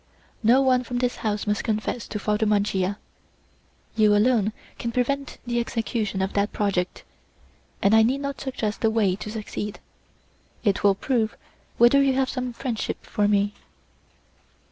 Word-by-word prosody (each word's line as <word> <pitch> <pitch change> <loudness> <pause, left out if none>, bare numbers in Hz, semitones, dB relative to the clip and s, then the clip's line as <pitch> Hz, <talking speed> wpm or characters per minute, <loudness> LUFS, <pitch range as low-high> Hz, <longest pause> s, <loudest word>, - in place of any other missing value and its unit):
No 250 +4 +5
one 255 -1 +3
from 245 0 -4
this 245 0 0
house 210 -1 -2
must 210 -1 0
confess 215 +1 -2
to 210 - -4
Father 210 +1 0
Mancia; 200 -2 +1 1.0
you 215 -2 +5
alone 215 -1 +3 0.3
can 235 - -2
prevent 275 +3 -1
the 240 0 0
execution 225 -4 -2
of 190 - -2
that 200 +1 +1
project, 190 -3 -1 0.8
and 200 +2 +5
I 220 - +7
need 255 +5 +2
not 280 -1 -4
suggest 225 -5 -3
the 225 - +3
way 215 -4 +2
to 210 - -7
succeed. 210 -1 -5 0.8
It 200 -4 +1
will 200 -1 +5
prove 225 0 -1 0.4
whether 240 +4 +6
you 275 -1 +3
have 265 0 +1
some 255 -2 -3
friendship 235 -2 -4
for 205 -1 +1
me." 205 0 +2
220 Hz, 155 wpm, -24 LUFS, 205-250 Hz, 1.0 s, I